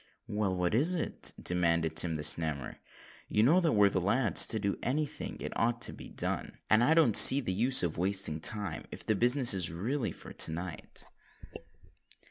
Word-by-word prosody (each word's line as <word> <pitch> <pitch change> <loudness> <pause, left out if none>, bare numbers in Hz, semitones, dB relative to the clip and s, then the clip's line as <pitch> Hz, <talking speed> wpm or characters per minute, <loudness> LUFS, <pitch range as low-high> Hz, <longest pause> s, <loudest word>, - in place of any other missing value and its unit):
"Well, 105 -3 -3
what 90 +1 -2
is 155 +11 +1
it?" 165 - -1
demanded 85 -2 -1
Tim 80 -1 +1
the 75 - -6
Snammer. 75 -3 0 0.5
"You 105 - 0
know 160 +10 +3
that 165 -4 -1
we're 105 -1 +3
the 95 - -2
lads 110 +5 +3
to 110 - -2
do 100 -2 -4
any 150 +4 -2
thing - - -8
it - - -7
ought 120 +1 -2
to - - -2
be - - -12
done; - - -6
and 110 +2 +3
I 155 +6 +2
don't 150 -10 +2
see 135 - +9
the 105 -9 -4
use 120 +5 +1
of 85 -2 -4
wasting 95 -4 -2
time, 100 -1 -2
if - - -10
the 110 - 0
business 125 +4 +3
is 90 -4 0
really 115 - -4
for - - -13
to - - -1
night." 85 +1 -9
100 Hz, 195 wpm, -29 LUFS, 85-125 Hz, 0.5 s, see